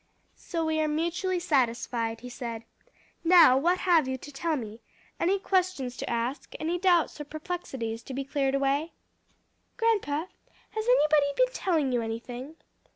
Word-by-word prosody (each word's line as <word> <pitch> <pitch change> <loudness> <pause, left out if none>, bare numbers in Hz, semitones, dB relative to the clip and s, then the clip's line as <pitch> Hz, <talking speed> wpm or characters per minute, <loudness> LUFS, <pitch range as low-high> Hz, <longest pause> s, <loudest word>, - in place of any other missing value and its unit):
"So 330 -2 -3
we 315 0 +1
are 310 - +1
mutually 340 +4 -1
satisfied," 235 -7 0
he 250 - -8
said. 235 -2 -6 0.6
"Now 335 -6 +7
what 345 +7 +2
have 335 -7 +3
you 260 0 -2
to 290 - -11
tell 315 +3 -1
me? 225 -4 -6 0.4
any 375 +4 +2
questions 370 -10 0
to - - -4
ask? 235 +4 -3
any 335 +3 -1
doubts 345 -5 +2
or - - -3
perplexities 285 -7 -5
to 270 - -7
be 275 - -2
cleared 275 -1 0
away?" 275 +4 0 0.8
"Grandpa, 405 -10 +1 0.5
has 435 0 -3
anybody 305 -12 +4
been - - +3
telling 315 -8 0
you 245 -1 +1
anything?" 240 +6 -6
295 Hz, 155 wpm, -28 LUFS, 255-345 Hz, 0.8 s, Now